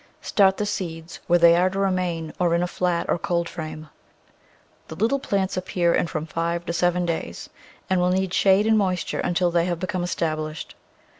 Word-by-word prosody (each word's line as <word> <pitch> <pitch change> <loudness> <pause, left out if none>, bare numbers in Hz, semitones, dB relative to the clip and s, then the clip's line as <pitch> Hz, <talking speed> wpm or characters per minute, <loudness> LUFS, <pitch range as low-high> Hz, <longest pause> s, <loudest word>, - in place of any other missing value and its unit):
Start 195 -2 +3
the 210 - -1
seeds 170 -4 -5
where 175 - +5
they 170 0 +6
are 180 +2 +3
to 190 - -6
remain, 180 -5 -1
or 175 -2 +2
in 170 - +1
a - - 0
flat 180 -1 -1
or - - 0
cold 170 0 -1
frame. 155 -2 -7 1.0
The 160 - -8
little 230 +9 +1
plants 195 -7 -1
appear 180 -2 +1
in - - +1
from 155 -1 -4
five 170 +1 -2
to 170 - -3
seven 175 +1 +1
days, 165 -1 -4 0.4
and 185 -1 +1
will 180 - +2
need 190 0 0
shade 195 +2 +4
and 220 -1 +4
moisture 185 -4 -1
until 175 0 +1
they 170 0 +2
have 175 -1 -1
become 185 0 -2
established. 155 -3 -3
175 Hz, 195 wpm, -23 LUFS, 170-190 Hz, 1.0 s, they